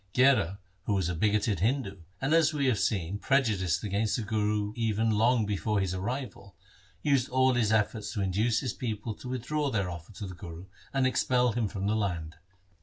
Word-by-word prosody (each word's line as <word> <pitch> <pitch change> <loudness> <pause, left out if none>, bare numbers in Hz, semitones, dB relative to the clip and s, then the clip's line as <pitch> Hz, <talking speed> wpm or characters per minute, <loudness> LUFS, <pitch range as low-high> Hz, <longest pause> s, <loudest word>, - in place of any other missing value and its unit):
Gherar, 120 -8 +4 0.3
who 105 - +1
was 95 -3 0
a - - -1
bigoted 105 +1 +1
Hindu, 105 - 0 0.2
and, 135 +6 0
as 160 -2 +4
we 140 -2 +1
have 125 -6 +2
seen, 100 -1 -1
prejudiced 100 -10 +1
against 105 +1 0
the 120 - -2
Guru 105 -1 0
even 110 -1 +1
long 115 +2 +3
before 105 +1 0
his 95 -2 -1
arrival, 100 - -5 0.5
used 140 -4 +2
all 130 0 +3
his 115 -3 +2
efforts 105 -1 0
to 105 - -2
induce 105 +5 +1
his 125 -4 -2
people 110 -2 -4
to 125 +4 -9
withdraw 140 +4 -1
their 100 -7 -1
offer 85 +3 -9
to 105 - -6
the 95 - -7
Guru 85 0 -9 0.3
and 135 -1 +1
expel 125 -1 +2
him 115 -1 0
from 100 0 -4
the 105 +2 +1
land. 85 -7 -2
105 Hz, 190 wpm, -29 LUFS, 100-125 Hz, 0.5 s, Gherar